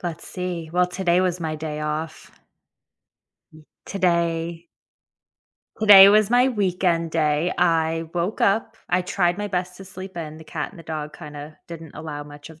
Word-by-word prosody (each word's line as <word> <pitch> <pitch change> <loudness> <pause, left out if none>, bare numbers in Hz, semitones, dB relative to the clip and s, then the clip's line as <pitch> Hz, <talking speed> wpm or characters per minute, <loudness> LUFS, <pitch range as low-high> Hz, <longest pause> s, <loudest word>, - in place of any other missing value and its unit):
Let's 170 -3 -6
see, 175 -3 -5
well, 180 +1 +3
today 180 -1 +1
was 180 -1 -1
my 155 -2 -3
day 150 -1 -5
off. 155 +1 -4 1.2
Hmm, 155 - -15 0.2
today 170 -2 -1 1.1
today 200 -3 +9
was 215 0 +4
my 245 +2 +4
weekend 180 -6 0
day. 155 +2 +1
I 165 -1 +1
woke 175 +5 -2
up, 200 +3 +1
I 180 - +3
tried 180 0 0
my 205 0 -3
best 180 -1 -3
to 195 - -10
sleep 190 0 -10
in, 155 -2 -6
the 160 - -12
cat 155 -1 -5
and 190 - -16
the - - -10
dog 150 -2 -6
kinda, 150 -1 -10
didn't 165 -1 -9
allow 155 -2 -6
much 145 +1 -12
of 160 -1 -15
170 Hz, 165 wpm, -23 LUFS, 155-185 Hz, 1.2 s, today